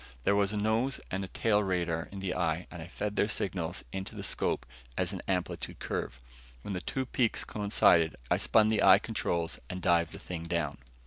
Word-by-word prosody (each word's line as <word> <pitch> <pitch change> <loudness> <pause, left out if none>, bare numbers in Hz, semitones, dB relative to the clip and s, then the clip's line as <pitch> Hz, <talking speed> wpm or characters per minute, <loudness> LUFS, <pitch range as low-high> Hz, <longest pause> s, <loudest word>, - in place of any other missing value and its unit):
There 100 - +3
was 100 -1 +2
a 105 - -2
nose 110 +6 +1
and 95 0 -3
tail 105 -2 +2
radar 85 -4 -1
in 100 -1 -7
the 95 -2 -1
eye 85 -1 0
and 85 - -7
I 80 - -7
fed 105 +3 -4
their 105 - +3
signals 90 -4 -2
into 95 0 -5
a - - -5
scope - - -1 0.3
as 95 +1 0
an 95 - -4
amplitude 90 -2 -2
curve. 60 - -4 0.4
When 100 - -4
the 90 - -3
two 130 +6 -2
peaks 120 -2 +1
coincided, 90 -6 +3 0.2
I - - +5
spun 110 -1 +4
the 110 -1 +2
eye - - +8
controls 85 -1 -2
and 90 - -4
dived 85 -2 +2
the - - -7
thing 85 -2 -6
down. 85 -4 -1
95 Hz, 200 wpm, -30 LUFS, 85-105 Hz, 0.4 s, eye